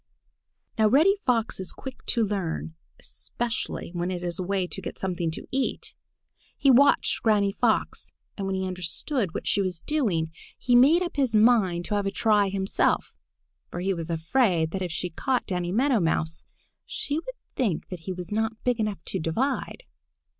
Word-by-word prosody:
Now 215 - +6
Reddy 310 - +5
Fox 230 -5 +1
is 185 - -3
quick 265 - -9
to 230 -3 +2
learn, 185 -5 -3 0.3
especially 235 -7 -4
when 175 0 -2
it 180 -1 -4
is 175 +1 -3
a - - -1
way 190 0 0
to 195 - -6
get - - -6
something 180 -3 -2
to 160 - -6
eat. 265 0 -2 0.6
He 275 - +5
watched 275 +3 +4
Granny 205 -3 +3
Fox, - - 0 0.2
and 195 -2 -3
when 195 - -1
he 190 0 -1
understood 185 - -2
what - - -4
she 200 - +2
was 185 -4 -3
doing, 195 - 0 0.3
he 245 -1 +2
made 295 +9 +6
up 345 - -5
his 260 -5 +1
mind 210 -6 +4
to - - -3
have 205 -1 0
a - - 0
try 210 -3 +3
himself, 190 0 0 0.6
for - - -5
he 190 +2 0
was 165 -2 -5
afraid 165 0 +1
that 190 - -3
if 180 -2 -2
she 175 +2 -3
caught 255 +9 -1
Danny 180 -2 -2
Meadow 250 +3 +3
Mouse, 160 -2 -1 0.4
she 295 +2 -1
would - - -8 0.2
think 210 -11 -1
that 180 - -6
he 175 +4 -6
was 180 0 -6
not 220 +1 -1
big 245 -2 +1
enough 210 -5 -2
to - - -2
divide. 250 - -2
195 Hz, 180 wpm, -26 LUFS, 175-245 Hz, 0.6 s, Now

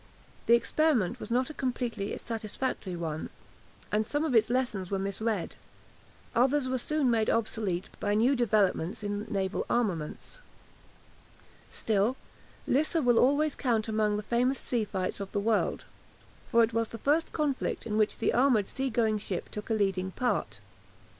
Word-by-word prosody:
The 235 - +7
experiment 245 - +1
was - - -7
not 250 +4 +1
a - - -9
completely 245 -7 -2
satisfactory 220 -3 -4
one, 160 -2 -4 0.6
and 215 +1 +2
some 290 +7 -1
of 300 - -1
its 225 -1 +4
lessons 240 -7 -1
were 195 - 0
misread. 200 0 -2 0.8
Others 260 +3 +3
were 255 0 -1
soon 285 0 +1
made 225 -2 +2
obsolete 210 -5 -1
by 205 0 0
new 245 +6 +4
developments 210 -5 +1
in 205 +1 -3
naval 195 -2 -1
armaments. 200 - -2 1.3
Still, 220 +4 0 0.5
Lissa 310 +5 +2
will 245 -5 +4
always 285 +3 +3
count 230 -5 0
among 215 -1 +1
the 210 - -4
famous 245 +4 +1
sea 235 -4 -1
fights 190 -2 -3
of 200 -1 -6
the 205 - +1
world, 215 +1 0 0.6
for 235 -2 +5
it 225 0 0
was 230 0 0
the 230 - -7
first 300 +7 +1
conflict 295 -4 -1
in 215 -2 -2
which 215 -1 +2
the - - +1
armoured 240 -5 +3
sea 265 0 -2
going 220 -2 +1
ship 190 -3 -4
took 210 +2 -6
a 225 - +2
leading 190 -3 0
part. 250 -1 -1
225 Hz, 160 wpm, -29 LUFS, 205-255 Hz, 1.3 s, The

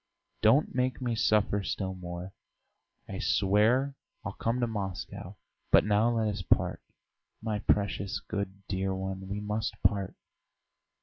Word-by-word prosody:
Don't 115 +8 +4
make 125 -1 0
me 125 -2 -1
suffer 105 -2 +2
still 95 -1 -2
more! 90 +1 -7 0.7
I - - -5
swear 110 +8 +3 0.3
I'll - - -3
come 115 +2 -1
to - - +4
Moscow. 100 -5 -5 0.4
But - - +7
now 105 +2 +4
let 110 -1 +2
us 105 - -2
part. - - +1 0.6
My 110 -1 -2
precious, 100 -1 +1
good, 100 -1 -4
dear 95 0 -1
one, 95 0 -4
we 100 +1 -2
must 105 +1 -2
part!" 100 -3 +2
105 Hz, 135 wpm, -30 LUFS, 95-110 Hz, 0.7 s, But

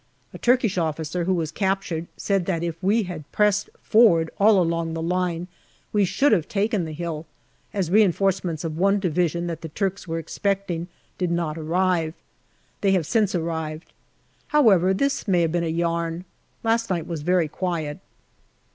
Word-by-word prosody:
A - - -9
Turkish 240 -6 +2
officer 160 +1 -2
who 190 - +2
was 165 -2 -2
captured 190 -4 -1
said 195 -3 0
that 170 -3 -1
if 170 -1 -4
we 210 +4 +2
had 170 -6 -8
pressed 210 -1 +2
forward 175 -8 +4
all 205 0 +6
along 165 -1 0
the - - -3
line 180 0 -1 0.5
we 205 -2 +4
should 275 +9 +2
have 175 -8 +2
taken 205 -3 0
the 160 - -6
hill, 160 -1 -5 0.4
as 190 -5 -2
reinforcements 190 -4 +2
of 160 -1 -4
one 195 +2 +4
division 175 -2 0
that 165 -2 -4
the 160 - -6
Turks 195 +3 -3
were 165 0 -2
expecting 175 +1 -2 0.3
did 180 -2 0
not 170 -3 -1
arrive. 165 0 0 0.7
They 195 -1 +3
have 180 -5 +1
since 210 0 +1
arrived. 160 -1 -4 0.5
However, 205 - +4
this 275 +8 0
may 180 -3 +3
have 165 -1 +1
been 170 0 0
a - - -1
yarn. 170 +1 -1 0.4
Last 230 0 +1
night 170 -4 -1
was 165 -3 -4
very 175 +1 +2
quiet. 160 -3 -3
175 Hz, 165 wpm, -24 LUFS, 165-195 Hz, 0.7 s, all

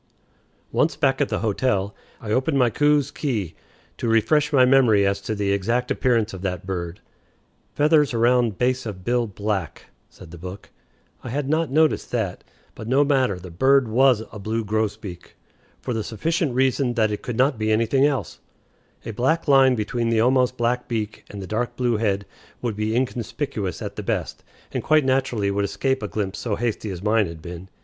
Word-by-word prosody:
Once 160 - +1
back 135 -2 +1
at 145 - +1
the - - -2
hotel, 105 -2 0 0.3
I 105 - -6
opened 130 +5 +1
my 125 -3 +3
Coues's 145 +1 +2
Key 110 - -2 0.4
to - - -3
refresh 145 +7 +2
my 130 -3 +5
memory 125 -6 +4
as 100 0 0
to 110 +2 -3
the 100 -1 0
exact 115 +6 0
appearance 115 -4 +1
of 95 - -7
that 90 -2 -3
bird. 90 0 -4 0.7
"Feathers 150 -1 +4
around 120 -3 +2
base 130 0 0
of 95 -4 -7
bill 120 -1 +1
black," 100 -3 -4 0.2
said 85 -3 -14
the 85 - -10
book. 90 +3 -9 0.5
I 125 - -6
had 140 +3 -2
not 160 +2 +1
noticed 155 +3 +2
that. 110 -7 -2 0.3
But 110 - -9
no 135 +4 +4
matter; 130 -8 +1
the 90 0 -10
bird 130 +8 +3
was 120 0 +3
a 105 - -8
blue 110 +3 -2
grosbeak, 105 -3 -3 0.5
for 125 - -2
the 110 -1 -2
sufficient 145 - -1
reason 130 -1 +1
that 110 -3 +2
it 105 - -4
could 120 -2 -5
not 130 -2 +2
be 110 0 0
anything 115 +5 +2
else. 145 -2 0 0.7
A - - -4
black 135 +10 0
line 135 -2 +5
between 115 +2 -1
the 115 -1 +2
almost 125 +1 +2
black 120 +1 0
beak 110 -3 -4
and 100 -1 -7
the - - -6
dark 110 +5 -2
blue 120 -3 +1
head 100 -2 0 0.3
would 120 -4 -3
be 110 +1 -1
inconspicuous 125 -4 -3
at - - -6
the - - -3
best, - - -3 0.3
and - - -2
quite 155 -2 +3
naturally 130 -6 +1
would 100 0 0
escape 110 +7 -1
a 105 - -3
glimpse 100 -2 -3
so 110 -4 -2
hasty 110 -2 -2
as 95 -1 -6
mine 105 -1 +2
had 85 -1 -9
been. 85 +3 -9
115 Hz, 190 wpm, -23 LUFS, 100-130 Hz, 0.7 s, my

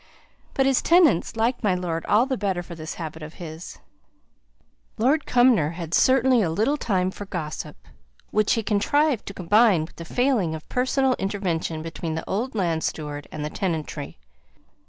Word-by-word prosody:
But 270 - +3
his 270 -1 +3
tenants 330 - +4
liked 235 +3 0
my 195 -4 +2
lord 170 -2 -3
all 220 +4 +4
the 265 -1 -1
better 190 -5 -2
for 175 - -9
this 160 -1 -7
habit 160 -1 -7
of 155 +1 -9
his. 160 0 -9 1.2
Lord 275 +7 +2
Cumnor 245 - +4
had 170 -2 -6
certainly 260 0 +4
a 180 - +1
little 220 - +1
time 185 -9 0
for 205 - -8
gossip, 160 -5 -5 0.5
which 215 -1 +2
he 225 - -1
contrived 255 +6 +1
to 200 - -5
combine 195 -2 +3
with 165 - -18
the 170 - -7
failing 220 -4 +1
of 155 - -10
personal 260 +1 +1
intervention 175 -5 -2
between 165 0 -4
the 160 - -5
old 225 +5 -2
land 170 -5 0
steward 145 -2 -4
and 150 -1 -5
the 150 - -4
tenantry. 160 - -4
190 Hz, 170 wpm, -24 LUFS, 165-245 Hz, 1.2 s, tenants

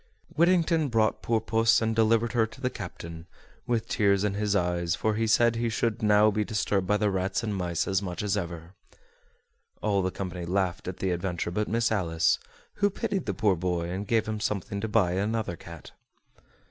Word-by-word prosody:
Whittington 165 -1 +3
brought 110 -2 +1
poor 115 -1 +1
puss 110 +1 +3
and 110 0 0
delivered 115 +1 +3
her 115 -3 +2
to 120 - -15
the 125 -1 -1
captain, 85 -4 -8 0.4
with 115 -1 0
tears 100 -2 +2
in 105 -1 0
his 105 0 0
eyes, 85 -2 0
for 110 +3 0
he 110 +1 0
said 115 +1 +4
he 115 0 0
should 115 +1 -1
now 105 0 +5
be 105 +1 0
disturbed 100 -3 -1
by 105 - +3
the 105 -1 +1
rats 95 +5 -1
and 105 -3 -2
mice 85 -3 -1
as 95 0 +1
much 90 -1 -4
as 105 -1 0
ever. 85 -2 -5 1.1
All 100 -2 +1
the 95 - 0
company 90 -2 -5
laughed 95 0 -1
at 95 - -4
the 95 - -1
adventure 85 -1 -2
but 105 +4 -1
Miss 115 0 +1
Alice, 80 -5 +1 0.4
who 205 0 +3
pitied 200 -3 -3
the - - -1
poor 105 -5 +2
boy, 85 0 -2
and 100 +3 -4
gave 115 -2 +1
him 110 -1 -3
something 100 -1 -2
to 110 - -2
buy 105 -5 +2
another 100 0 -1
cat. 85 -1 -11
105 Hz, 200 wpm, -27 LUFS, 90-115 Hz, 1.1 s, now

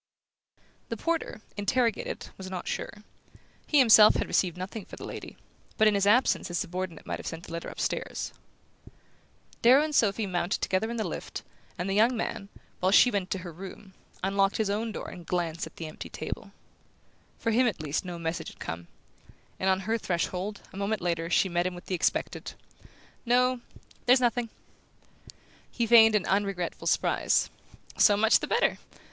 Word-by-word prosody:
The - - -3
porter, 330 -9 -2 0.2
interrogated, 230 +3 -1
was 190 -1 -8
not 185 -2 -5
sure. - - -3 0.8
He 300 - +3
himself 225 -5 +8
had - - -1
received 180 -2 +1
nothing 195 +4 -6
for - - -11
the - - -8
lady, - - -8 0.4
but 220 - +5
in 215 - +4
his 200 0 +2
absence 240 +5 +3
his 175 - -3
subordinate 180 -1 -4
might - - -4
have - - -7
sent 165 +1 -6
a - - -10
letter 170 0 -5
upstairs. - - -3 1.3
Darrow 260 +5 +7
and 310 -1 -3
Sophy 215 -4 +2
mounted 180 -1 -1
together 195 +4 0
in 235 - -4
the 220 - 0
lift, - - -6 0.3
and 180 - -3
the 195 - 0
young 230 +4 +3
man, 200 -2 -4 0.3
while 185 +1 +2
she 245 +4 +7
went 200 -4 0
into 185 0 -4
her 175 - -6
room, 190 +2 -10 0.3
unlocked 195 +1 +2
his 215 -2 0
own 220 +2 -1
door - - -6
and 175 -2 -10
glanced 170 -2 -2
at - - -16
the 165 - -6
empty 155 - -8
table. - - -6 0.9
For 230 - -1
him 245 +3 +4
at 205 -7 -2
least 150 -1 -2
no 175 -2 -6
message 165 0 -3
had - - -11
come; 85 +1 -6 0.7
and 190 - +1
on 190 0 +2
her 220 +4 -1
threshold, 185 +2 -2
a - - -9
moment 200 0 -1
later, 170 -1 -1
she 185 - +3
met 175 0 0
him 185 - -5
with 175 - -11
the - - -4
expected: 180 - -1 0.7
"No 250 +1 +2 0.5
there's 250 +1 +7
nothing!" 245 -1 +1 1.2
He 235 - -1
feigned 225 -1 +7
an 205 - +2
unregretful 195 -3 -1
surprise. - - +2 0.5
"So 205 - +6
much 220 +2 +5
the - - -4
better! - - +1
195 Hz, 180 wpm, -28 LUFS, 180-225 Hz, 1.3 s, himself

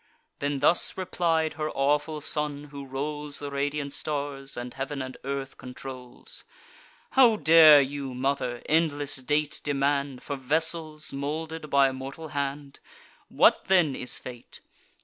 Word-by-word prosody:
Then 140 -1 -2
thus 170 +4 +2
replied 165 -4 0
her 155 0 -3
awful 150 +2 0
son, 150 0 -3
who 140 -1 -8
rolls 145 +2 -4
The 145 -1 -6
radiant 140 0 -2
stars, 140 -2 -4
and 120 0 -5
heav'n 135 +1 -4
and 130 -1 -5
earth 135 0 -4
controls: 125 0 -9 0.7
"How 250 -4 +6
dare 160 -5 +8
you, 135 -1 -5
mother, 125 -2 -1
endless 145 -3 +1
date 150 +3 -1
demand 140 -2 0
For 145 - -4
vessels 155 +2 -1
moulded 155 +3 -4
by 140 -1 +5
a 135 - -3
mortal 135 +5 -7
hand? 140 -1 -4 0.5
What - - +4
then 175 -8 +3
is 125 - -5
fate? 120 -2 -10
145 Hz, 135 wpm, -27 LUFS, 135-155 Hz, 0.7 s, dare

